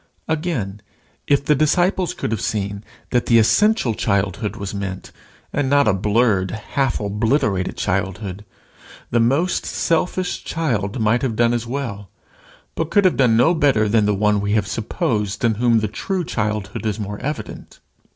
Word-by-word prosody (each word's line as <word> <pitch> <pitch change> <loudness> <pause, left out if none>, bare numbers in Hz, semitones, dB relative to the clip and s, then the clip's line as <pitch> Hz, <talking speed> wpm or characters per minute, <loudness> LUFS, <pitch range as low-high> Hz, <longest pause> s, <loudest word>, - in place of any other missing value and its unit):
Again, 150 - -2 0.5
if 140 -1 +2
the 150 - +4
disciples 175 +4 +1
could - - -3
have 110 - -2
seen 100 -1 -2 0.3
that 125 -1 +1
the 115 - +5
essential 170 - +3
childhood 100 0 -1
was 100 -3 -5
meant, 95 -2 -5 0.4
and 140 -2 0
not 140 -1 +4
a 110 - +4
blurred 105 -1 +2
and 110 - -5
half 135 +4 -1
obliterated 105 -2 0
childhood, 95 +1 -2 0.7
the 120 - +3
most 140 +10 +1
selfish 180 +2 -1
child 120 -9 -2
might 110 +2 +2
have 125 -5 -1
done 120 +1 +3
as 120 -1 -2
well, 115 -7 -4 0.6
but 165 -1 -2
could 205 -2 +3
have 185 - +3
done 120 -4 +4
no 125 +9 +4
better 140 -9 +2
than 105 0 +2
the 105 - +2
one 105 0 +2
we 100 0 -1
have 105 -3 +2
supposed 105 0 -2
in 115 - +3
whom 115 0 +2
the 110 - 0
true 185 - -3
childhood 105 - -3
is 110 -1 -2
more 105 0 -5
evident. 150 +1 -6
110 Hz, 165 wpm, -20 LUFS, 105-140 Hz, 0.7 s, the